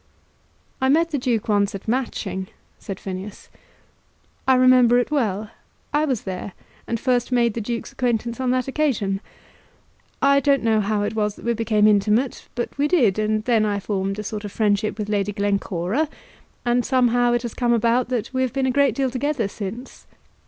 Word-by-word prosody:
"I 265 - +2
met 330 +4 +3
the 290 - 0
Duke 240 -4 -1
once 205 -2 +1
at 195 - -9
Matching," 210 -6 -2 0.3
said 195 -2 -7
Phineas. 190 +1 -7 1.0
"I 260 - +6
remember 255 -1 +5
it 245 +4 0
well. 215 -7 -1 0.4
I 300 +1 +3
was 260 -7 -1
there, 190 0 -5 0.3
and 230 - -2
first 245 0 0
made 235 -3 +2
the 230 - -3
Duke's 230 +2 -4
acquaintance 235 -1 -1
on 260 -1 0
that 255 0 +1
occasion. 240 -9 0 1.0
I 280 0 +4
don't 280 -2 +2
know 220 -1 +3
how 205 0 0
it 205 - -2
was 210 -2 -1
that - - -13
we 235 - +2
became 220 -2 +2
intimate; 215 +5 +2
but 240 - -3
we 290 - +3
did, 240 - +3
and 215 0 0
then 230 -3 +3
I 205 -1 0
formed 195 0 -2
a 210 - -4
sort 215 0 -5
of 205 - -6
friendship 210 0 0
with 210 -2 -3
Lady 205 -1 -1
Glencora; 200 - -1 0.6
and 240 0 +2
somehow 245 -2 +2
it 240 0 0
has 235 - -4
come 240 -2 0
about 235 +2 +2
that 250 0 -2
we 260 - 0
have 260 -1 -1
been 270 -1 0
a 260 - +2
great 280 +1 +2
deal 270 -2 0
together 265 -3 -1
since." 215 +5 -8
230 Hz, 190 wpm, -22 LUFS, 205-255 Hz, 1.0 s, I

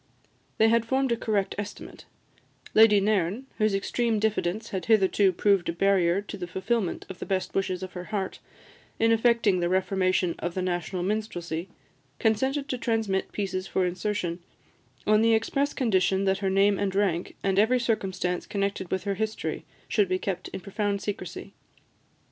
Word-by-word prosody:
They 220 - +5
had 230 0 +3
formed 265 +2 0
a - - +3
correct 210 -4 -1
estimate: 205 0 -8 0.7
Lady 215 -2 +7
Nairn, 200 +3 0
whose 215 -2 +2
extreme 225 +3 0
diffidence 215 0 -1
had 190 - -3
hitherto 200 -2 +4
proved 195 -1 +2
a - - -1
barrier 190 0 +2
to 205 - -7
the 180 -2 -5
fulfilment 190 +2 -2
of 190 - -9
the - - -5
best 190 -2 -1
wishes 190 -1 -1
of 185 - -7
her 180 0 -6
heart, 195 -2 -3 0.6
in 225 0 +3
effecting 225 -4 +3
the 175 0 0
reformation 185 -1 +1
of 175 0 -3
the 185 - -1
national 175 0 -2
minstrelsy, 180 -4 -3 0.5
consented 265 +6 +1
to 255 - -2
transmit 220 -5 -1
pieces 190 -2 -3
for 185 - +1
insertion, 180 -1 -2 0.7
on 215 0 +4
the 225 0 +5
express 275 +6 0
condition 195 -6 +1
that 190 0 +1
her 195 -1 0
name 195 +1 +3
and 195 -1 -1
rank, 185 -4 0
and 195 0 +2
every 240 +4 +4
circumstance 190 -6 -1
connected 200 -2 -2
with 190 - -2
her 200 - -1
history, 220 +2 -3 0.2
should 205 -4 +2
be 185 - +1
kept 185 -1 -4
in - - -7
profound 200 +1 -2
secrecy. 205 +1 -6
200 Hz, 165 wpm, -27 LUFS, 185-220 Hz, 0.7 s, Lady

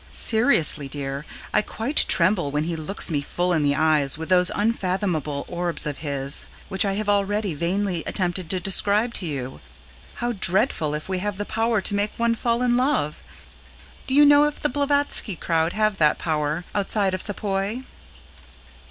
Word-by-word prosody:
Seriously, 220 - +1
dear, 140 +1 -5 0.3
I 210 - +4
quite 225 +7 +1
tremble 175 -3 +4
when 150 +1 -1
he 165 +1 -3
looks 160 +4 0
me 145 -2 0
full 175 +5 -1
in 160 - +1
the 145 -1 +1
eyes 150 -2 +2
with 160 +2 -7
those 180 -1 +5
unfathomable 185 - -1
orbs 175 -1 -2
of 150 -2 -4
his, 140 -2 -2 0.2
which 190 0 +1
I 195 - 0
have 210 +1 -3
already 205 -1 0
vainly 175 +2 -2
attempted 180 -2 -2
to 185 - +1
describe 205 +5 +2
to 180 - -4
you. 130 -4 -5 0.6
How 240 0 -2
dreadful 185 - +1
if 150 - -6
we 190 -1 -2
have 205 0 -3
the 205 - -3
power 225 -1 0
to 205 - +2
make 205 +1 0
one 235 0 +1
fall 235 +1 -1
in 245 -1 +2
love! 250 - 0 0.9
Do 265 - 0
you 295 +1 +7
know 290 0 +6
if 295 0 -3
the 295 - 0
Blavatsky 285 -6 +1
crowd 165 0 0
have 215 -1 0
that 150 -3 +3
power 155 +1 -2
outside 200 -1 +1
of 185 - -2
Sepoy? 205 +2 -2
190 Hz, 175 wpm, -23 LUFS, 155-215 Hz, 0.9 s, you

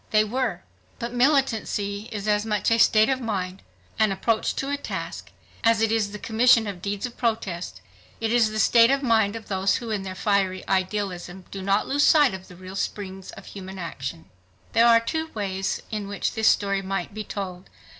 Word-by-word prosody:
They 215 0 +4
were. 235 -2 -2 0.3
But 235 +1 -5
militancy 230 -6 +1
is 210 -1 -5
as 210 0 +2
much 215 0 0
a 230 - +3
state 215 -1 +5
of 265 -1 0
mind, 190 -5 -3 0.4
an 215 -2 +4
approach 220 +3 0
to 275 +1 -2
a - - +1
task, 285 - -6 0.3
as 230 -1 +4
it 225 0 +2
is 220 -2 +1
the 210 - -6
commission 230 +1 +4
of 195 -4 -6
deeds 200 +2 -3
of 245 - -8
protest. 205 -7 -2 0.4
It 225 0 0
is 235 -3 +4
the 215 - -5
state 230 +2 +6
of 275 +1 +1
mind 220 -4 +3
of 225 - -8
those 195 -1 +1
who 235 -3 -4
is 210 -2 -1
their 190 -1 -6
fiery 195 -2 0
idealism 190 -1 -2
do 195 - -6
not 195 +2 +1
lose 285 +1 +1
sight 295 -7 +5
of 190 0 -8
the 180 - -13
real 185 +1 -10
springs 195 -1 -4
of 195 - -11
human 190 -1 -9
action. 135 - -6 0.5
There 230 +1 +5
are 230 -1 +7
two 315 +8 -2
ways 195 -2 -2
in 210 -2 -3
which 200 0 -2
this 220 -2 +1
story 195 -1 +3
might 195 -1 -3
be 215 +1 -5
told. 190 -3 -6
210 Hz, 200 wpm, -25 LUFS, 195-230 Hz, 0.5 s, are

